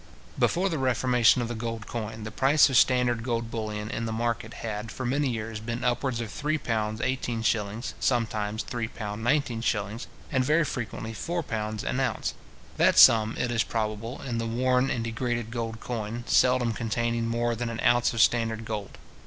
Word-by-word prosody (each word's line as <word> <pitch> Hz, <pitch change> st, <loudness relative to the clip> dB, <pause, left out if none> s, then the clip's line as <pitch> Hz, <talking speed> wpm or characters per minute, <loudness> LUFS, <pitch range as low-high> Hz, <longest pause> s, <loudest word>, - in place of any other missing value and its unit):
Before 180 Hz, +3 st, +2 dB
the 165 Hz, -6 st, -2 dB
reformation 125 Hz, -2 st, +3 dB
of -, -, -3 dB
the 120 Hz, -, -4 dB
gold 115 Hz, -1 st, -4 dB
coin, 110 Hz, -1 st, -5 dB
the 110 Hz, -, -6 dB
price 135 Hz, +5 st, +4 dB
of -, -, -1 dB
standard 125 Hz, -2 st, +4 dB
gold 115 Hz, -1 st, -2 dB
bullion 105 Hz, -1 st, -4 dB
in 115 Hz, -, -3 dB
the 110 Hz, -, -3 dB
market 115 Hz, 0 st, -2 dB
had, 110 Hz, 0 st, -4 dB
for 130 Hz, -, -5 dB
many 140 Hz, +3 st, +1 dB
years, 115 Hz, -2 st, -4 dB
been 115 Hz, +2 st, -4 dB
upwards 125 Hz, 0 st, 0 dB
of 115 Hz, -2 st, -4 dB
£3:18s. 115 Hz, -4 st, -1 dB
sometimes 110 Hz, -3 st, 0 dB
£ 120 Hz, -2 st, -4 dB
3:19s, 115 Hz, -1 st, -1 dB, 0.2 s
and 130 Hz, -2 st, +2 dB
very 155 Hz, +4 st, +3 dB
frequently 115 Hz, -4 st, -4 dB
£4 110 Hz, -8 st, -3 dB
an 125 Hz, -, -1 dB
ounce; 125 Hz, -6 st, -1 dB, 0.4 s
that -, -, +4 dB
sum, 110 Hz, -1 st, +7 dB
it 120 Hz, -, -1 dB
is 115 Hz, -2 st, +2 dB
probable, 110 Hz, +2 st, -3 dB
in 120 Hz, -3 st, -2 dB
the 115 Hz, -, -2 dB
worn 125 Hz, +3 st, +2 dB
and 115 Hz, -, -1 dB
degraded 115 Hz, 0 st, -2 dB
gold 115 Hz, -2 st, -4 dB
coin, 115 Hz, 0 st, -4 dB
seldom 125 Hz, -2 st, +3 dB
containing 115 Hz, +1 st, -1 dB
more 120 Hz, +1 st, 0 dB
than 120 Hz, +1 st, -3 dB
an 115 Hz, 0 st, -5 dB
ounce 120 Hz, 0 st, +4 dB
of 115 Hz, -, +1 dB
standard 115 Hz, +1 st, +2 dB
gold. 105 Hz, -2 st, -5 dB
115 Hz, 170 wpm, -27 LUFS, 110-125 Hz, 0.4 s, sum